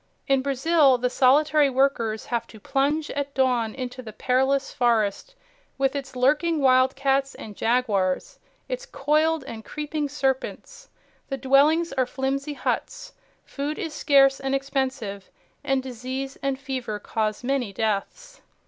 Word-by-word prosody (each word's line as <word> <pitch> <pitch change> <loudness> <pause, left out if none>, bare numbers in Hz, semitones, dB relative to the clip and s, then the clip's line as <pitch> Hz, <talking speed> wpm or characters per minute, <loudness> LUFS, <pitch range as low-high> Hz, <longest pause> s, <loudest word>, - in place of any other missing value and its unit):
In 270 -1 +3
Brazil, 275 0 +3
the 250 0 -1
solitary 290 +3 +4
workers 250 -5 0
have 235 -1 -2
to 220 - -14
plunge 290 +6 0
at 280 0 -4
dawn 250 -4 +1
into 255 -1 -6
the 225 -3 -9
perilous 265 +4 0
forest, 235 - 0 0.4
with 270 +1 +1
its 275 -2 -5
lurking 300 +6 +2
wildcats 270 +1 +2
and 210 -2 -9
jaguars, 210 -6 0 0.3
its - - -5
coiled 310 - +1
and 225 -4 -8
creeping 300 +2 -4
serpents. 275 - -3 0.4
The 270 - -2
dwellings 285 +5 +3
are 260 -2 +1
flimsy 275 +3 -2
huts, - - -3 0.3
food 290 +2 -4
is 320 -2 -4
scarce 275 -2 +4
and 270 0 -1
expensive, 260 -8 -3 0.3
and 270 -1 0
disease 260 +2 -5
and 275 -1 -1
fever 260 -6 -4
cause 215 +1 -2
many 255 -4 -1
deaths. 220 - -3
270 Hz, 135 wpm, -24 LUFS, 250-285 Hz, 0.4 s, solitary